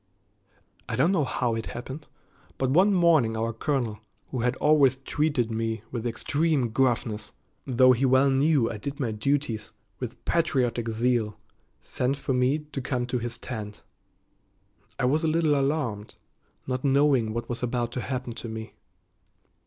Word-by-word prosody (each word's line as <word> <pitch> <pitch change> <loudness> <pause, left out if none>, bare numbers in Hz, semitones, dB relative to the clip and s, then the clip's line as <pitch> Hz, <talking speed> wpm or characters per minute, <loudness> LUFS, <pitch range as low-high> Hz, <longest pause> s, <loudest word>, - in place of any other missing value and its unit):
I - - -1
don't 170 - +3
know 165 -7 +2
how 125 -2 -1
it 115 0 -3
happened, 135 +5 -7 0.5
but 130 -1 0
one 185 +8 +5
morning 160 - +3
our 115 +1 -1
colonel, 115 -3 -1 0.3
who 130 - -2
had 125 +2 +1
always 145 -3 +4
treated 135 -3 -1
me 110 -1 -2
with 120 -1 -3
extreme 140 +3 0
gruffness, 115 -3 0 0.3
though 130 0 +5
he 125 +1 +1
well 130 +1 +4
knew 135 -2 +3
I 115 - -4
did 140 +7 -6
my 120 -5 -1
duties 115 -1 -1 0.3
with 125 -2 -7
patriotic 125 -8 +1
zeal, 115 -2 0 0.5
sent 130 +3 -1
for 135 -1 -2
me 125 +3 +2
to 150 -2 -7
come 125 -1 -1
to 125 0 -2
his 120 +1 -4
tent. 105 -4 -7 1.1
I - - 0
was 150 +6 +2
a - - +2
little 160 -1 +2
alarmed, 135 -7 -1 0.5
not 130 0 -3
knowing 135 -5 +3
what 115 +1 -4
was 120 - -4
about 120 -1 -1
to 125 - -3
happen 125 -2 -4
to 115 - -7
me. 110 0 -7
125 Hz, 160 wpm, -26 LUFS, 115-140 Hz, 1.1 s, one